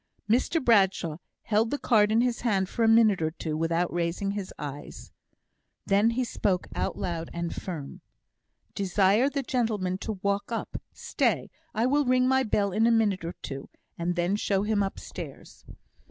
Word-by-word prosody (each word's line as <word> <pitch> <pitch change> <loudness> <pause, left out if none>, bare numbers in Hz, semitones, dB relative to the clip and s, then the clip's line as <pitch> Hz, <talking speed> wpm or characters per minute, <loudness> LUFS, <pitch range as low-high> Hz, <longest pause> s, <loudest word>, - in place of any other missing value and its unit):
Mr 250 +9 +2
Bradshaw 190 -8 +3 0.3
held 220 +1 +1
the 290 - -1
card 215 -6 +3
in 225 +2 +4
his 245 -1 0
hand 195 -6 +1
for 230 - -2
a - - +4
minute 225 -5 +5
or 160 - +1
two 160 -1 -4
without 165 +2 0
raising 175 +3 -1
his 200 -2 -5
eyes. 145 -1 -8 0.7
Then 205 +3 +3
he 245 +2 0
spoke 195 -6 -1
out - - -2
loud 170 -3 -3
and 170 0 -3
firm: 160 -7 -6 0.7
"Desire 200 +6 +3
the 280 -1 -2
gentleman 215 -7 -1
to 220 - -3
walk 200 +2 -1
up. 230 - -4
Stay! - - -1 0.2
I 225 +2 +2
will 285 +3 +2
ring 255 0 +3
my 265 0 +3
bell 205 -4 +1
in 220 +4 +3
a - - +4
minute 210 -5 +2
or 170 +1 -5
two, 135 0 -6 0.3
and 175 +1 -2
then 175 +3 +1
show 200 -2 0
him 210 -1 +1
upstairs." 195 -1 -7
200 Hz, 170 wpm, -27 LUFS, 175-230 Hz, 0.7 s, minute